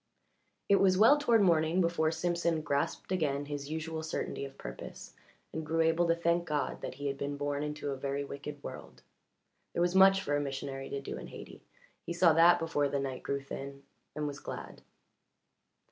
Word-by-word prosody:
It 200 - +5
was 190 -2 +4
well 230 +9 +7
toward 235 -7 +4
morning 165 -1 +3
before 170 -3 +2
Simpson 170 -1 0
grasped 145 +4 -1
again 145 -6 0
his 145 -1 -5
usual 160 0 -3
certainty 160 -3 -3
of 135 0 -11
purpose - - -8 0.4
and 160 - -3
grew 165 +1 0
able 165 +1 +3
to 165 - +3
thank 170 0 +1
God 150 -2 -2
that - - -5
he 145 +2 -7
had 140 -1 -2
been 140 0 -3
born 145 0 -2
into 150 -1 -3
a - - -2
very 140 +1 -2
wicked 140 +1 -7
world. - - -9 0.7
There - - 0
was 175 0 +1
much 195 0 +7
for 145 - 0
a 145 - +1
missionary 135 -1 -4
to 140 - -3
do - - -6
in - - -8
Hayti - - -11 0.4
he 170 - -4
saw 170 -1 +5
that 170 +2 +7
before 145 -3 0
the 140 - -1
night 135 -2 -4
grew 140 0 -2
thin, 140 0 -7 0.3
and 150 - -2
was 145 -1 -4
glad. - - -8
155 Hz, 190 wpm, -31 LUFS, 140-170 Hz, 0.7 s, well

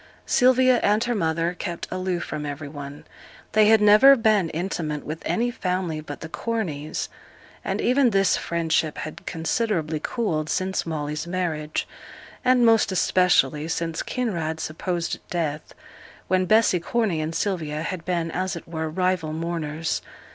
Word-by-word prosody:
Sylvia 255 -1 +4
and 210 +2 +3
her 240 0 0
mother 165 -3 0
kept 175 -1 -5
aloof 185 -1 -2
from 150 -1 -5
every 145 0 -5
one. 145 0 -8 0.5
They 215 0 +5
had 220 0 +6
never 215 +7 +8
been 215 -7 +2
intimate 160 -3 -3
with 155 +2 -5
any 240 +1 +1
family 180 -7 -2
but 145 -2 -8
the 160 - -5
Corneys, 160 -7 -3 0.6
and - - -2
even 255 +1 +3
this 195 -2 +3
friendship 165 -2 0
had 155 - -7
considerably 165 -2 -1
cooled 160 -10 -1
since 190 -2 -1
Molly's 150 0 -3
marriage, 165 -4 -2 0.6
and 250 -2 +4
most 225 -3 +4
especially 175 -6 +2
since 165 0 -2
Kinraid's 170 -10 -2
supposed 170 +2 -3
death, 155 -3 -3 0.5
when 185 0 +2
Bessy 215 -4 +4
Corney 190 -2 0
and 160 +1 -3
Sylvia 155 -6 -2
had 170 0 -4
been, 170 -2 -1
as 185 +2 -2
it 170 - -9
were, 160 -1 -3
rival 180 -2 0
mourners. 160 -1 -2
170 Hz, 145 wpm, -24 LUFS, 155-205 Hz, 0.6 s, never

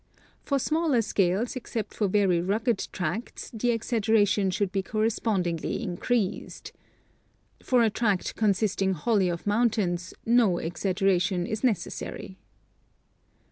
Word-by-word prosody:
For 280 - 0
smaller 300 -3 +1
scales, 200 +4 0
except 230 -4 -4
for 210 - 0
very 190 -3 +2
rugged 215 +4 0
tracts, 185 +6 -4
the 235 +2 -1
exaggeration 220 -4 +2
should 185 +1 -1
be 195 -1 0
correspondingly 210 -5 -1
increased. 195 +3 -2 0.9
For 250 -2 +3
a 220 - +2
tract 210 -4 0
consisting 200 -2 +1
wholly 190 +2 +1
of 170 -1 -4
mountains 205 -5 0
no 230 -4 +4
exag 175 +3 -2
geration 185 -2 +1
is 215 +2 -4
necessary." 210 -3 -3
205 Hz, 115 wpm, -27 LUFS, 185-230 Hz, 0.9 s, no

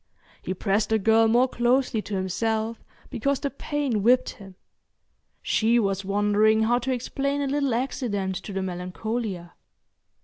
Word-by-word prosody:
He 185 - -4
pressed 200 +3 0
the 220 - +3
girl 225 +2 +4
more 240 +3 +4
closely 240 -2 +1
to 205 - -5
himself 220 +4 -2 0.3
because 275 +3 0
the 280 - -3
pain 280 -6 -2
whipped 245 +4 +3
him. 195 -2 -13 0.9
She 230 +2 +2
was 195 -3 0
wondering 210 +2 +2
how 240 +2 +2
to 260 +2 -2
explain 275 +3 -2
a 285 - 0
little 275 -3 0
accident 230 -6 -2
to 195 +2 -8
the 195 0 -2
Melancolia. 185 +1 -4
220 Hz, 145 wpm, -25 LUFS, 200-250 Hz, 0.9 s, girl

